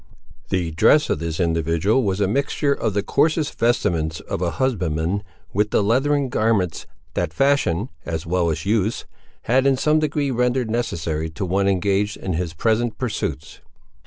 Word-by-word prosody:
The 90 -3 -1
dress 150 - +4
of - - 0
this 80 -1 -4
individual 85 - +1
was 100 -4 -1
a 100 - +2
mixture 140 +5 +1
of 110 -7 -2
the 100 - +1
coarsest 155 +6 +1
vestments 80 -9 +1
of - - -5
a 90 - +1
husbandman 90 - 0 0.3
with 105 +2 +1
the 105 - +2
leathern 135 +6 +2
garments, 110 -7 0 0.3
that 85 -3 -1
fashion 120 - +1 0.2
as 80 -1 -4
well 85 0 +1
as 80 +2 -3
use, 110 +1 0 0.4
had 130 +3 +3
in 135 -1 +3
some 150 +3 +3
degree 145 -2 0
rendered 125 -1 0
necessary 80 -9 -2
to 95 +5 -4
one 95 +2 +1
engaged 100 +1 +1
in 95 - -4
his 80 -1 -3
present 110 +5 0
pursuits. 125 -5 -4
100 Hz, 160 wpm, -22 LUFS, 85-125 Hz, 0.4 s, dress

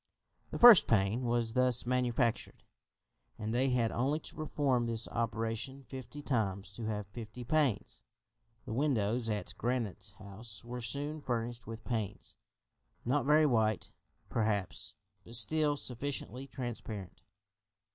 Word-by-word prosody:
The - - -4
first 240 -5 +10
pane 110 +3 +2
was 120 -1 0
thus 125 -1 +3
manufactured, 125 -1 0 0.7
and 110 0 -3
they 130 +2 +2
had 120 -3 +2
only 140 +6 0
to - - -7
perform 140 -6 0
this 115 -1 +1
operation 115 +4 -2
fifty 135 +3 -8
times 100 -7 -1
to 115 +2 -6
have 105 -2 -2
fifty 110 +4 -8
panes. 135 -4 0 0.6
The - - -4
windows 120 -4 +1
at 105 -1 -3
Granite 110 -5 -2
House 105 0 -7
were 120 +1 -6
soon 145 +6 -3
furnished 120 -3 -3
with 110 0 -7
panes; 110 -5 -3 0.7
not 135 +2 +1
very 155 +1 +6
white, 110 -6 +1 0.4
perhaps, 100 -5 -1 0.3
but 115 - -6
still 145 +6 +3
sufficiently 135 -1 -4
transparent. 110 -9 -6
120 Hz, 125 wpm, -33 LUFS, 110-130 Hz, 0.7 s, first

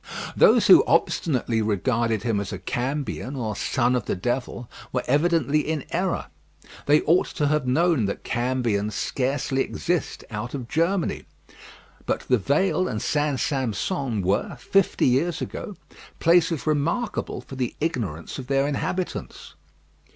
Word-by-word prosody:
Those - - +5
who - - +8
obstinately 120 -7 +1
regarded 110 +2 0
him 115 -4 0
as 100 0 -4
a 95 - -4
cambion, 130 +6 -3
or 110 -4 -3
son 125 +3 +1
of 120 - -1
the - - -1
devil, 120 +4 -3 0.2
were 125 - -1
evidently 150 0 +2
in 150 -2 -2
error. 180 +1 -1 0.6
They 150 +1 +5
ought 170 +4 +3
to 145 -4 +1
have 150 -3 0
known 155 -2 +2
that 100 - -4
cambions 120 -4 -1
scarcely 135 +2 -1
exist 175 +1 -2
out 110 +5 -4
of 125 -4 -5
Germany. 170 +6 0 0.8
But - - 0
The 125 -2 +1
Vale 180 - +1
and 110 -4 -3
St. 145 0 0
Sampson 130 - -1
were, 95 +3 0
fifty 195 -2 +2
years 135 +7 +2
ago, 205 - -6 0.4
places 170 -2 +3
remarkable 160 +10 -1
for 135 - -10
the 125 -2 -2
ignorance 115 - -3
of 130 - -7
their 135 +1 +2
inhabitants. 180 +5 -4
135 Hz, 140 wpm, -24 LUFS, 120-155 Hz, 0.8 s, who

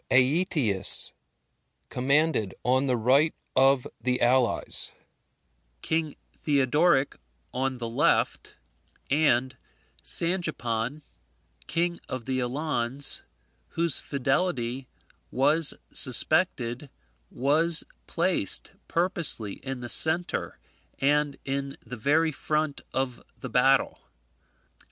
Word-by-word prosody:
Aetius 130 - +4 0.8
commanded 140 -4 +1
on 130 +3 +1
the 125 -2 +1
right 135 +7 +2 0.2
of 135 -1 +4
the 125 0 0
allies; 125 0 +3 0.9
King 160 -2 -2 0.3
Theodoric 145 +1 +2 0.4
on 130 0 -2
the 120 -1 -5
left; 115 - 0 0.6
and 130 -3 +2 0.5
Sangipan, 150 -7 -1 0.6
king 170 +1 -1
of 130 -3 -5
the 130 -1 -1
Alans, 130 0 -1 0.5
whose 170 -3 -1
fidelity 135 -2 -2 0.4
was 145 +4 +1 0.2
suspected, 130 -1 +1 0.4
was 155 +5 +2 0.2
placed - - -1 0.2
purposely 165 - -1
in 135 -2 -5
the 120 - -5
centre 165 +7 +1 0.4
and 145 +1 +1
in 140 0 -4
the 125 +2 -7
very 150 +7 +1
front 150 0 -2
of 130 -2 -3 0.2
the 130 - -7
battle. 135 +2 +2
135 Hz, 90 wpm, -26 LUFS, 125-155 Hz, 0.9 s, Aetius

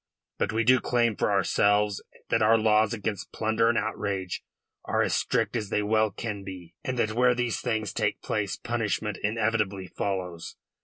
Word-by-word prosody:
But 100 - 0
we 110 +1 +1
do 130 +2 +5
claim 120 -3 +1
for - - 0
ourselves 100 +1 +2 0.3
that - - +2
our 110 +1 +5
laws 110 -1 +3
against 105 -2 -4
plunder 110 +1 +1
and 120 - +2
outrage 100 -4 -2 0.4
are - - +1
as - - 0
strict - - 0
as 105 -4 -2
they 105 - +1
well 110 +1 +2
can 105 0 -5
be, 90 -3 -9
and 130 -3 -3
that 110 -2 +1
where 125 +1 +4
these 120 -2 -1
things 110 -4 -1
take 105 -3 0
place 100 -3 -1
punishment 110 -3 -2
inevitably 105 -3 0
follows. 90 -3 -4
110 Hz, 170 wpm, -27 LUFS, 100-115 Hz, 0.4 s, do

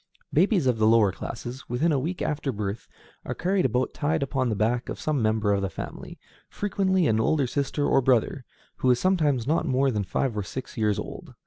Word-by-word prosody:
Babies 180 - +3
of 125 -3 +1
the 110 - +4
lower 110 -3 +5
classes, 120 +6 -7
within 130 +8 +1
a - - +2
few - - +1
weeks 170 +7 -3
after 150 -2 -1
birth, 105 -1 -4 0.4
are - - -4
carried 185 +1 +1
about 125 +1 0
tied 155 0 0
upon 130 -2 -1
the 110 - 0
back 115 +4 0
of - - -5
some 150 -4 0
member 110 -1 +2
of 100 - 0
the 95 - -1
family, 80 - -8 0.3
frequently 190 -3 0
an 110 -5 +2
older 140 +5 +2
sister 140 +3 -1
or 135 - +3
brother, 130 +1 +1 0.3
who 130 - +1
is 125 -1 +4
sometimes 150 -10 +2
not 160 +3 +1
more 135 0 +2
than 105 -3 -1
five 120 +5 -1
or 105 - -1
six 130 +6 -7
years 105 -4 +1
old. - - -7
130 Hz, 215 wpm, -26 LUFS, 110-155 Hz, 0.4 s, lower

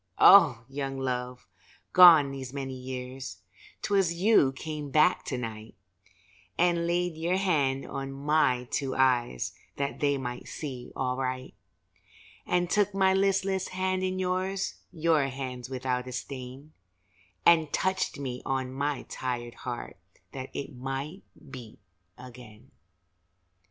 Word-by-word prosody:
Oh, 150 - +7
Young 135 0 -4
Love, 125 -2 -3 0.5
gone 165 -6 +9
these 135 -2 -6
many 135 -1 -5
years, 130 0 -7 0.4
'Twas 195 -4 +2
you 180 -7 +4
came 150 +1 -6
back 155 +5 +3
to 130 - -3
night, 110 -2 -7 0.8
And 170 -1 +2
laid 175 -1 0
your 170 +3 0
hand 145 -8 +1
on 135 0 -5
my 135 -3 +1
two 135 -2 -1
eyes 125 - +1 0.2
That 140 0 -3
they 140 -1 +2
might 125 -2 -6
see 130 -5 -7
aright, 130 0 -2 0.9
And 180 0 +1
took 205 +1 +1
my 190 -1 +4
listless 195 -1 +1
hand 185 0 -1
in 185 0 -1
yours 185 +1 -1 0.2
(Your 160 -4 +2
hands 130 -2 -6
without 125 -1 -2
a 125 - -6
stain), 130 +3 -7 0.7
And 160 -3 +5
touched 190 -3 0
me 130 -3 -5
on 130 -1 -2
my 140 0 -2
tired 120 -2 -4
heart 120 -1 -7 0.3
That 130 -1 -7
it 140 +1 -5
might 135 +8 -5 0.3
beat 120 -5 -10 0.4
again. 125 -1 -13
135 Hz, 125 wpm, -28 LUFS, 125-170 Hz, 0.9 s, gone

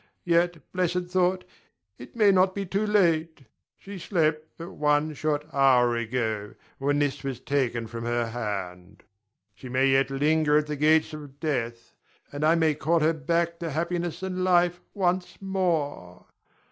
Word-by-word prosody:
Yet, 175 0 +2
blessed 180 -1 -1
thought, 185 0 +1 0.6
it 125 - -12
may 210 -3 +5
not 185 0 +3
be 200 -1 -3
too 200 +4 -1
late. 165 -7 +1 0.3
She 195 -1 -9
slept 155 -3 0
but 165 +1 -8
one 150 +1 +1
short 150 0 -2
hour 125 -3 +4
ago, 110 -3 -3 0.2
when 145 +1 +1
this 145 -1 -1
was 135 -3 -4
taken 125 -5 -1
from 115 +1 -7
her 120 0 0
hand. 95 -6 -6 0.5
She 130 - -11
may 130 +2 +2
yet 135 +1 +3
linger 150 +2 +2
at 150 - +1
the 150 0 -4
gates 155 +2 +3
of 145 -2 -10
death, 120 -7 -3 0.4
and 145 +1 -4
I 160 +2 +4
may 160 -2 +2
call 160 +3 +1
her 160 +2 +3
back 170 +3 -1
to 170 -2 -4
happiness 170 +3 -3
and 185 -1 -2
life 175 -1 +2
once 185 -2 -1
more. 165 - -2
155 Hz, 160 wpm, -26 LUFS, 135-175 Hz, 0.6 s, may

